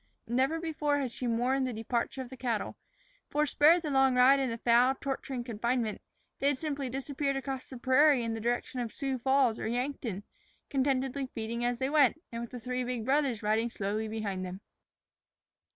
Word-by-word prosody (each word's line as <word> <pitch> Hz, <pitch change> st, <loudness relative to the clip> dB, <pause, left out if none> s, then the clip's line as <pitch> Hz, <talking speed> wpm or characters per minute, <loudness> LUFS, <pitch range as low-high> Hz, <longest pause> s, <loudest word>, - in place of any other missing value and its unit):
Never 265 Hz, +7 st, +1 dB
before 300 Hz, -3 st, 0 dB
had 265 Hz, -4 st, -2 dB
she 250 Hz, -, -4 dB
mourned 255 Hz, +3 st, +1 dB
the 250 Hz, -, -3 dB
departure 235 Hz, +4 st, -2 dB
of 250 Hz, -, -13 dB
the -, -, -7 dB
cattle, 240 Hz, -4 st, -2 dB, 0.5 s
for, 300 Hz, +1 st, +2 dB
spared 315 Hz, +4 st, +5 dB
the 305 Hz, -, -2 dB
long 270 Hz, -1 st, +4 dB
ride 260 Hz, +2 st, +6 dB
in 250 Hz, -4 st, -1 dB
foul, 240 Hz, +3 st, +4 dB
torturing 270 Hz, -2 st, -3 dB
confinement, 235 Hz, -1 st, -1 dB, 0.4 s
they 275 Hz, -, +1 dB
had 285 Hz, -2 st, +2 dB
simply 285 Hz, -3 st, -3 dB
disappeared 275 Hz, +2 st, -2 dB
across 270 Hz, -1 st, -4 dB
the 260 Hz, -, -8 dB
prairie 260 Hz, +1 st, +4 dB
in 230 Hz, -1 st, -2 dB
the 225 Hz, -, -4 dB
direction 240 Hz, +2 st, -1 dB
of 235 Hz, -2 st, -3 dB
Sioux 270 Hz, -2 st, -3 dB
Falls 265 Hz, -2 st, +2 dB
or -, -, -3 dB
Yankton, 240 Hz, -4 st, -3 dB, 0.5 s
contentedly 270 Hz, 0 st, 0 dB
feeding 230 Hz, +1 st, -3 dB
as 245 Hz, 0 st, 0 dB
they 260 Hz, +1 st, -1 dB
went, 295 Hz, -1 st, +4 dB
and 230 Hz, 0 st, -4 dB
with 235 Hz, -, -6 dB
the 250 Hz, -, -7 dB
three 250 Hz, +2 st, -2 dB
big 245 Hz, -3 st, -3 dB
brothers 265 Hz, -4 st, +1 dB
riding 220 Hz, +3 st, +1 dB
slowly 215 Hz, +1 st, -2 dB
behind 210 Hz, -4 st, -3 dB
them. 185 Hz, +1 st, -6 dB
255 Hz, 185 wpm, -30 LUFS, 235-275 Hz, 0.5 s, ride